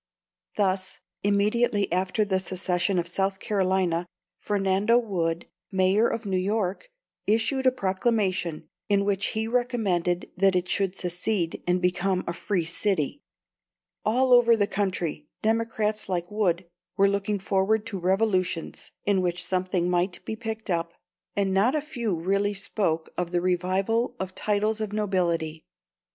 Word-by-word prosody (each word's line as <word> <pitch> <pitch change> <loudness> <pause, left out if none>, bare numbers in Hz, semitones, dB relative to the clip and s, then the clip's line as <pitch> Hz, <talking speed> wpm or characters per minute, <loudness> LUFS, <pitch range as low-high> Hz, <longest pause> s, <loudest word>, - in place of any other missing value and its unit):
Thus, 190 -2 0 0.2
immediately 205 +1 +2
after 185 +4 +1
the 190 -2 +1
secession 185 0 0
of 175 -1 0
South 190 +2 -1
Carolina, 185 -4 +1 0.3
Fernando 200 +2 +2
Wood, 175 -8 -1 0.3
Mayor 190 +4 +3
of 230 - -3
New 190 -2 0
York, 200 - -1 0.4
issued 230 +5 +2
a - - +6
proclamation, 190 -7 0 0.2
in 200 -1 +3
which 200 -1 +1
he 220 0 0
recommended 215 -8 0
that 195 0 +3
it 180 0 +1
should 195 -1 +1
secede, 180 0 -1
and 180 0 +1
become 180 +1 +1
a 170 - -2
"free 175 0 -1
city." 185 - -1 0.8
All 250 +4 +3
over 235 -1 +7
the 205 - +3
country, 180 -7 -2 0.2
Democrats 220 -2 0
like 175 0 -2
Wood 185 -4 +1 0.3
were 200 0 +5
looking 200 +1 0
forward 195 +3 +1
to 205 -4 -4
revolutions 185 -2 0
in 200 -2 +3
which 175 -1 0
something 185 -1 0
might 180 +1 0
be 220 - -3
picked 220 -2 -5
up, 170 0 -1 0.4
and 195 -1 +1
not 215 +9 +3
a - - +2
few 245 - -2
really 200 +4 +1
spoke 190 -5 -1
of 180 -1 -1
the 175 0 +1
revival 185 +7 0
of 190 0 -4
titles 215 +2 0
of 210 -1 -3
nobility. 170 -6 0
195 Hz, 140 wpm, -26 LUFS, 180-215 Hz, 0.8 s, over